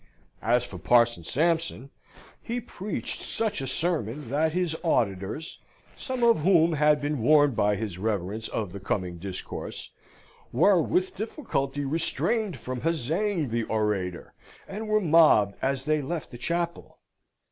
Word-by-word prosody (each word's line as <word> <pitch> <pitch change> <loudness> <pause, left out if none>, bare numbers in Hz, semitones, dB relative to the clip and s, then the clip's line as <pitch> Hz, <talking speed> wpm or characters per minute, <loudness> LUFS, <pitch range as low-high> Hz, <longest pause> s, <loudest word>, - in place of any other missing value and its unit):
As 120 +2 +2
for - - -9
Parson 120 -6 +3
Sampson, 160 - 0 0.5
he 235 +2 -3
preached 210 -3 -5
such 220 -9 -1
a 135 - -3
sermon 145 - -1
that 155 +3 +2
his 175 -1 0
auditors 110 - -1 0.4
(some 260 -2 -4
of 230 -5 +5
whom 170 -1 +4
had 150 0 +4
been 145 -3 -2
warned 145 0 +5
by 105 0 +2
his 100 -4 -5
reverence 105 +1 -2
of 105 -5 -3
the 100 - -7
coming 90 -2 -3
discourse) 95 +1 -6 0.6
were 195 -4 +4
with 370 - 0
difficulty 145 - -3
restrained 180 - 0
from 125 -1 -5
huzzaing 165 - 0
the 115 0 0
orator, 105 -5 -2 0.3
and 215 +3 -6
were 215 0 +2
mobbed 155 - +5
as 135 0 -1
they 155 -1 +1
left 160 +3 -4
the 120 - -8
chapel. 170 +5 -3
145 Hz, 140 wpm, -27 LUFS, 110-170 Hz, 0.6 s, of